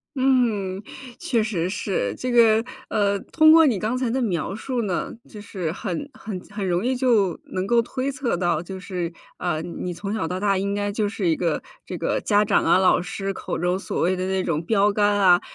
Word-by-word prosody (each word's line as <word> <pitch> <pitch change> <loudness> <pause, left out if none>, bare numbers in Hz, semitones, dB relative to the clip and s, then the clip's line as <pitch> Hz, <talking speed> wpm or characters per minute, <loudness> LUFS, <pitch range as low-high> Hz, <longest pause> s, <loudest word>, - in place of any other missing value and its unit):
嗯， 230 -8 +1 0.4
确 280 -10 0
实 190 -6 -1
是。 190 - -2
这 255 0 -3
个， 225 -2 +5 0.3
呃， 200 -1 +1
通 315 +7 +4
过 325 0 +8
你 230 -10 +2
刚 225 +4 -1
才 250 -3 -1
的 265 - 0
描 190 -6 -1
述 240 +3 -3
呢， 190 -4 -2 0.2
就 210 - -10
是 185 -6 -4
很 195 - -4
很 220 -7 -6
很 205 -2 -3
容 180 +4 0
易 260 +1 +1
就 225 -9 +2
能 185 0 -3
够 235 +3 +3
推 260 +3 -3
测 260 -8 -2
到 170 -3 0
就 190 +1 -7
是， 180 -3 -4 0.3
呃， 175 -3 -1
你 175 +1 -5
从 200 +4 -5
小 215 -7 -1
到 180 +2 -3
大 200 0 +2
应 200 +1 -1
该 205 0 -1
就 210 0 -1
是 205 -3 -2
一 165 - +3
个 170 -2 -1 0.2
这 180 - -6
个 165 - -1
家 205 0 +3
长 205 - +2
啊， - - +4
老 185 -1 +4
师 195 +1 -4
口 - - -4
中 180 +2 0
所 - - -3
谓 180 +2 +2
的 185 0 -2
那 190 -1 0
种 160 -1 -1
标 205 +2 +3
杆 205 -1 +2
啊， 180 -3 +6
200 Hz, 230 characters per minute, -23 LUFS, 180-230 Hz, 0.4 s, 过